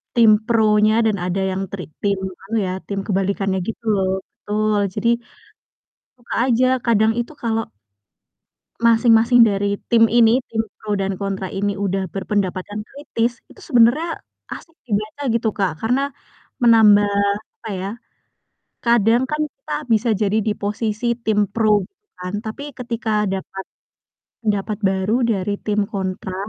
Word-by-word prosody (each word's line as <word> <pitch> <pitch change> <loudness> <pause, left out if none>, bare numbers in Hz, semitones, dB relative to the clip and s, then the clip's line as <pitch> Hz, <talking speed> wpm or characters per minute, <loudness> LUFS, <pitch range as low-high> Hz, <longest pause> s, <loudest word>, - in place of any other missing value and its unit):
tim 230 -2 +6
pronya 215 -2 +3
dan 215 -2 +1
ada 185 +2 -1
yang 190 +1 -2
tri 195 -2 -5 0.2
tim 200 -1 0 0.2
anu 210 +4 -4
ya, - - -2 0.2
tim 200 -1 -3
kebalikannya 195 -1 0
gitu 225 - -5
loh, 190 -2 +1 0.2
betul. 215 0 -1 0.2
Jadi 210 +2 -1 1.1
suka 240 - -7
aja 255 0 +3 0.2
kadang 220 -1 +3
itu 240 - -5
kalau 225 -1 0 1.2
masing-masing 230 +1 +5
dari 200 -2 +3 0.2
tim 230 -1 +6
ini, 230 +1 +4
tim 220 -1 0 0.2
pro 210 -1 -4
dan 195 -1 -2
kontra 195 -1 -3
ini 200 +1 -1
udah 195 -1 -1
berpendapatan 200 +1 -2
kritis, 240 -4 -3
itu - - -18
sebenarnya 275 +6 +3 0.3
asik 325 0 -13
dibaca 215 +4 -3
gitu, 230 -1 +1
Kak, 190 -7 -2
karena 270 +5 0 0.5
menambah 215 -3 +6 0.6
apa - - -4
ya, 190 +1 -4 1.0
kadang 235 +1 +4
kan 300 +3 -2
kita 270 - -9 0.2
bisa 225 +1 +2
jadi 210 +1 +2
di 215 - +1
posisi 215 +3 -2
tim 210 -4 0
pro 210 -1 +2
gitu 395 +2 -56 0.2
kan, 180 +1 -5
tapi 220 +6 -6
ketika 225 -4 -1
dapat 190 0 -5 0.7
pendapat 210 -1 -1
baru 190 +3 +1
dari 205 -3 0
tim 210 -1 -1
kontra 190 -2 -4
215 Hz, 140 wpm, -20 LUFS, 200-230 Hz, 1.2 s, tim